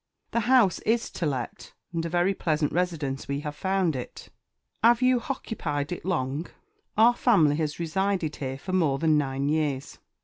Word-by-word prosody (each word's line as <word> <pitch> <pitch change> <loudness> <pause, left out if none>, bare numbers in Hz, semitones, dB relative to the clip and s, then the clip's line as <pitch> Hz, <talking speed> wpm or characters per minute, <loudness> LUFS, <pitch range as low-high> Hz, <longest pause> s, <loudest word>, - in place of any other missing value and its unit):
"The 235 - +1
house 240 -9 +5
is 230 +1 0
to 170 - -2
let 130 -5 -5 0.2
and 165 -1 -1
a 170 - -3
very 175 +3 +2
pleasant 155 -5 0
residence 160 -6 -2
we 140 +1 -2
have 150 0 -5
found 190 -2 0
it." 125 - -7 0.5
"'Ave 240 +2 +5
you 255 -1 +4
_h_occupied 165 - -3
it 175 - -5
long?" 155 -3 -1 0.5
"Our 230 +3 +6
family 165 - +4
has 155 -1 -2
resided 175 -1 -1
here 135 -1 -4
for 185 +7 -6
more 160 -7 +2
than 155 +1 +3
nine 140 -1 0
years." 145 -3 -1
165 Hz, 170 wpm, -26 LUFS, 145-190 Hz, 0.5 s, Our